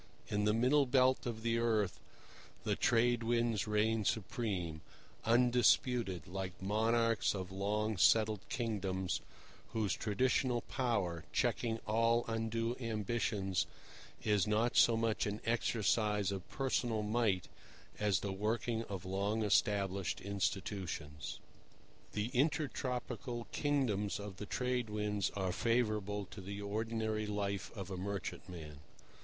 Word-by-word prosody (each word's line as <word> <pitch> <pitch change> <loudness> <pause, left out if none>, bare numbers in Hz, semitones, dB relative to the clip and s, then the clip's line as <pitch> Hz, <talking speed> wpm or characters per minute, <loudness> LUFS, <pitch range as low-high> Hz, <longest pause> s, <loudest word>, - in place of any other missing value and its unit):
In 105 0 +1
the 105 - +4
middle 130 +5 +4
belt 130 0 +3
of 110 -2 -4
the 115 0 +1
earth 110 -5 +1 0.6
the - - +1
Trade 120 0 +3
Winds 115 -2 +1
reign 105 +1 +2
supreme, 95 - -2 0.4
undisputed, 120 - +3
like 95 0 -5
monarchs 115 +3 +2
of 95 -1 -5
long 105 +2 -1
settled 110 +2 +4
kingdoms, 95 -6 -1 0.5
whose 110 -3 +1
traditional 125 +2 +1
power, 95 -13 -1
checking 115 -2 +1
all 115 +2 +3
undue 115 +1 -1
ambitions, 105 -4 -1 0.6
is 105 -3 +2
not 110 +3 +2
so 115 -1 +6
much 115 -1 +1
an 105 +1 -3
exercise 105 -3 +1
of 95 -2 -5
personal 120 -5 0
might 105 -4 +1 0.5
as 105 -4 +2
the 100 -2 -2
working 110 +3 -1
of 95 -3 -6
long 100 +4 0
established 100 -3 +1
institutions. 95 -6 -3 0.8
The 105 +3 -1
intertropical 125 -4 -1
kingdoms 120 -10 0
of 100 -2 -7
the 105 - -6
Trade 125 -1 -1
Winds 105 -2 0
are 95 -2 0
favourable 105 -2 0
to 100 - -8
the 100 +2 -6
ordinary 110 +1 -2
life 100 0 -2
of 95 -1 -5
a 95 - -3
merchantman. 90 -5 -5
105 Hz, 120 wpm, -35 LUFS, 100-115 Hz, 0.8 s, so